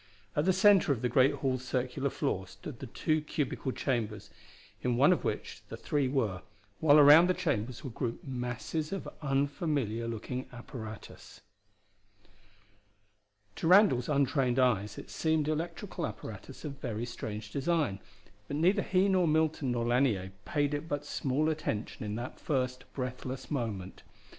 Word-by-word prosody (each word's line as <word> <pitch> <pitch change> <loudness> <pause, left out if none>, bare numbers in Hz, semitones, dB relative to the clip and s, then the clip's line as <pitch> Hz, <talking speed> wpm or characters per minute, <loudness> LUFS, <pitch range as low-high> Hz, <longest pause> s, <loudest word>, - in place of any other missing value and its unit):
At 150 - +2
the 190 - +5
center 190 -3 +5
of 130 -3 -1
the 125 - +2
great 130 +3 +5
hall's 130 -2 -1
circular 130 +2 -1
floor 95 -6 -2
stood 120 +7 -9
the 135 - -6
two 155 +6 0
cubical 145 -3 -2
chambers 110 -6 -2 0.5
in 125 -1 0
one 145 +8 +6
of - - -3
which - - -3
the - - -6
three 145 -3 0
were, 115 -9 0 0.4
while 150 -1 +6
around 150 +4 +8
the 185 - +3
chambers 125 -5 -2
were 135 - -5
grouped 115 0 -4
masses 130 +5 -3
of 195 - -4
unfamiliar 140 - 0
looking 120 +3 -4
apparatus. 120 -3 -9 2.2
To - - -1
Randall's 180 - +5
untrained 135 -3 +2
eyes 110 -6 +2
it - - -9
seemed 160 -2 +1
electrical 165 +2 -3
apparatus - - -9
of 140 -2 -6
very 115 -2 -3
strange 110 -3 -6
design, 145 - 0 0.5
but 145 - -3
neither 185 +6 +3
he 190 0 +2
nor 185 -3 +3
Milton 155 -3 +1
nor 120 -1 -1
Lanier 120 -7 +1
paid 145 -1 0
it 145 +2 -3
but 145 0 -2
small 140 +3 0
attention 150 -11 -2
in 105 0 -3
that 120 +3 -6
first 125 -3 -2
breathless 130 +1 -5
moment. 110 -9 -3
135 Hz, 150 wpm, -31 LUFS, 120-155 Hz, 2.2 s, around